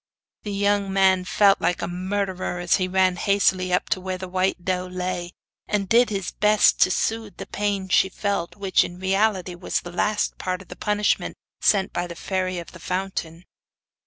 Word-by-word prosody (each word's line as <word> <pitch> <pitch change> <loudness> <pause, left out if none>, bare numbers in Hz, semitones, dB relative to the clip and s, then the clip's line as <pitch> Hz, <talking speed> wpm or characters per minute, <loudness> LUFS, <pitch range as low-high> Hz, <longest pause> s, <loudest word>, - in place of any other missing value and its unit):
The 210 - -5
young 200 0 +1
man 190 -1 +3
felt 200 +1 +4
like 180 0 0
a - - -1
murderer 185 0 -3
as 175 0 +2
he 185 -2 -1
ran 185 -1 +2
hastily 190 -2 +2
up 180 - +1
to 185 - 0
where 185 0 -3
the 185 0 -6
white 185 -1 -1
doe 185 -1 -1
lay, 180 -1 -4 0.3
and 200 -2 -1
did 235 +4 +4
his 195 -3 -3
best 210 0 +3
to - - +6
soothe 220 +2 -2
the - - -6
pain 200 -2 -2
she 190 +1 +3
felt, 200 -3 -2
which, 195 -2 +2
in 175 - -7
reality, 190 -1 +1
was 175 +1 -2
the 175 - -9
last 210 +4 -1
part 185 0 -2
of - - -26
the - - -8
punishment 210 0 0 0.2
sent 195 -2 +2
by 175 0 -2
the 170 - -8
Fairy 185 +1 -2
of 170 - -7
the 170 - -12
Fountain. 180 -2 -4
190 Hz, 190 wpm, -23 LUFS, 180-200 Hz, 0.3 s, to